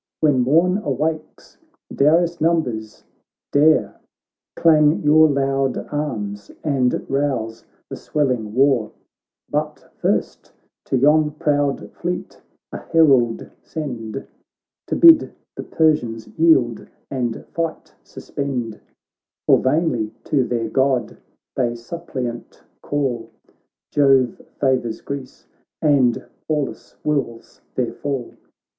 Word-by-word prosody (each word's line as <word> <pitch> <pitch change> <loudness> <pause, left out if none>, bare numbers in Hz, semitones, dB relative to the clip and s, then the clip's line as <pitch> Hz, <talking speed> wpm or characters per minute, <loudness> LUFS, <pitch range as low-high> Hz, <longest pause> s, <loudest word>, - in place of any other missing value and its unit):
When 145 -4 +3
morn 170 +9 +3
awakes, 155 - -4 0.3
Darius' 170 +3 +2
numbers 130 -10 -1 0.5
dare. 155 +2 +3 0.6
Clang 155 -2 +4
your 155 +1 +6
loud 135 -1 0 0.2
arms, 105 -9 -4
and 135 -5 0
rouse 135 -5 -2 0.2
the - - -6
swelling 125 -8 -2
war; 130 -5 +2 0.5
But - - -4
first - - -2 0.3
to 130 - 0
yon 150 +3 +4
proud 145 -2 -1
fleet 175 +1 -5 0.3
a - - -5
herald 135 -8 +3
send 130 -6 -6 0.6
To - - -1
bid 330 -2 +6 0.2
the - - -5
Persians 125 -9 0
yield, 135 -8 +2 0.2
and 120 -4 -3
fight 165 -1 -4
sus - - -13
pend; 125 -6 -3 0.7
For - - +5
vainly 130 -6 0
to 135 -3 +1
their 120 -2 -2
God 130 +1 0 0.4
they 120 -3 0
suppliant 120 -2 -6 0.2
call, 125 -6 -2 0.6
Jove 135 -4 +3 0.2
favours 130 -4 0
Greece, 140 -2 -7 0.3
and 135 -6 +2 0.2
Pallas 150 -3 -3
wills 140 -6 -3
their 125 -2 -1
fall.' 135 -4 -4
135 Hz, 100 wpm, -21 LUFS, 120-155 Hz, 0.7 s, your